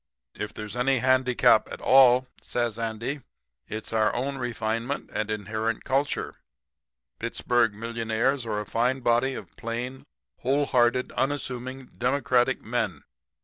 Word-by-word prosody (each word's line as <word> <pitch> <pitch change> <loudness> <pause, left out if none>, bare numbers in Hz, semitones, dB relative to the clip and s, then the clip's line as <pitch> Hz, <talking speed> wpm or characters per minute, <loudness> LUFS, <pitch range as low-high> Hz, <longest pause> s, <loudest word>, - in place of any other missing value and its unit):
"'If 105 - -5
there's 105 +1 -7
any 130 +2 +2
handicap 130 0 +4
at - - -6
all,' 130 -1 +6 0.2
says 120 -2 -2
Andy, 115 +5 -3 0.5
'it's 110 +1 -6
our 110 -1 +3
own 135 +3 -2
refinement 115 +2 -2
and 110 0 -2
inherent 110 +1 -2
culture. 140 +2 0 0.9
Pittsburg 120 -1 +1
millionaires 115 +4 -1
are 110 -3 -2
a 105 - -4
fine 125 +5 0
body 120 +2 +2
of - - -9
plain, 120 +3 -5 0.3
wholehearted, 130 -2 +2
unassuming, 130 -2 -2
democratic 130 -1 +1
men. 110 - -2
120 Hz, 120 wpm, -26 LUFS, 115-130 Hz, 0.9 s, all